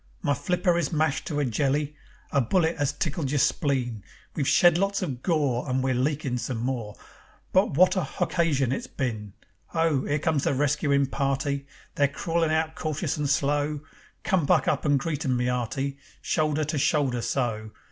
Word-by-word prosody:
My 145 - +2
flipper 175 +4 +1
is 155 - -1
mashed 155 -2 0
to 150 -2 -2
a 145 - +1
jelly. 140 +4 0 0.4
A 140 - +3
bullet 165 - +1
'as 145 -1 +1
tickled 145 -1 -2
your 145 - 0
spleen. 125 -7 0 0.3
We've 140 -5 -1
shed 175 -1 +5
lots 195 0 0
of 130 -8 -4
gore 145 -5 0
And 130 0 0
we're 130 0 +1
leakin' 135 0 -1
some 120 0 -3
more, 115 -3 -3 0.6
But 185 -6 +3
wot 185 +3 +5
a 185 - +1
hoccasion 145 -4 0
it's 240 - -3
been! 110 - -4 0.3
Ho! 160 -5 +1
'Ere 145 - +1
comes 150 -1 0
the - - +1
rescuin' 140 0 +2
party. 140 +1 -1 0.3
They're 145 - +3
crawlin' 165 +3 -1
out 160 0 0
cautious 155 -2 -2
and 145 -2 -1
slow. 145 +1 +1 0.4
Come! 185 -8 +1
Buck - - +3
up - - 0
and 145 -1 +4
greet 150 -1 -3
'em, 130 -2 +1
my 120 - 0
'earty, 135 +3 -2 0.2
Shoulder 155 -1 0
to 150 0 -2
shoulder 130 -4 +1
so. 115 -4 -2
145 Hz, 180 wpm, -26 LUFS, 130-155 Hz, 0.6 s, shed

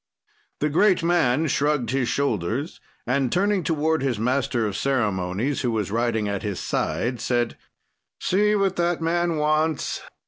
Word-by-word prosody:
"The 150 - +2
great 180 +4 +3
man 160 -4 +2
shrugged 145 -5 0
his 130 -3 0
shoulders 130 - -1 0.2
and 130 0 0
turning 200 +1 +2
toward 160 0 0
his 130 -4 0
master 125 0 0
of 105 -2 -3
ceremonies, 110 0 -1
who 125 - 0
was 110 -4 -2
riding 115 -2 0
at 100 -1 -2
his 100 -4 -3
side, 120 -1 -2
said: 120 -2 0 0.6
"'See 210 +3 +2
what 195 -2 +1
that 175 0 +1
man 170 +1 0
wants.' 155 0 0
140 Hz, 145 wpm, -24 LUFS, 115-160 Hz, 0.6 s, great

